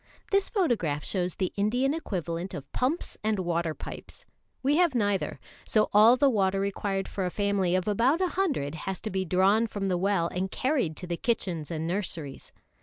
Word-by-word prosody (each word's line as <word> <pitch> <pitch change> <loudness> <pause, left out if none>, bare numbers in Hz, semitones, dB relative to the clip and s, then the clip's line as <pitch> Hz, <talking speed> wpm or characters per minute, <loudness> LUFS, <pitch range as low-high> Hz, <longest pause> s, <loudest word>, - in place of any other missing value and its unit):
This 395 0 +2
photograph 220 - 0
shows 180 -2 -2
the 185 -2 -2
Indian 245 +7 +1
equivalent 180 - -3
of 140 -1 -8
pumps 275 +7 -2
and 215 -1 +1
water 170 -3 -1
pipes. - - -8 0.4
We 285 +3 +3
have 345 -6 +3
neither; 205 -4 0 0.2
so 215 -1 +1
all 220 +4 +7
the 280 - +4
water 195 -6 +2
required 195 0 -1
for 195 - -3
a 180 - 0
family 200 -2 +1
of 185 +1 0
about 240 - +3
a 370 -1 +1
hundred 290 - -1 0.2
has 190 - -3
to 215 - -4
be 190 0 -1
drawn 195 +6 +3
from 200 -2 -3
the 180 -1 +1
well 190 -3 +1
and 185 +1 -2
carried 255 - 0
to - - -5
the 170 -1 -3
kitchens 180 -10 -1
and 160 -1 -3
nurseries. 170 -6 -4
195 Hz, 185 wpm, -28 LUFS, 175-235 Hz, 0.4 s, all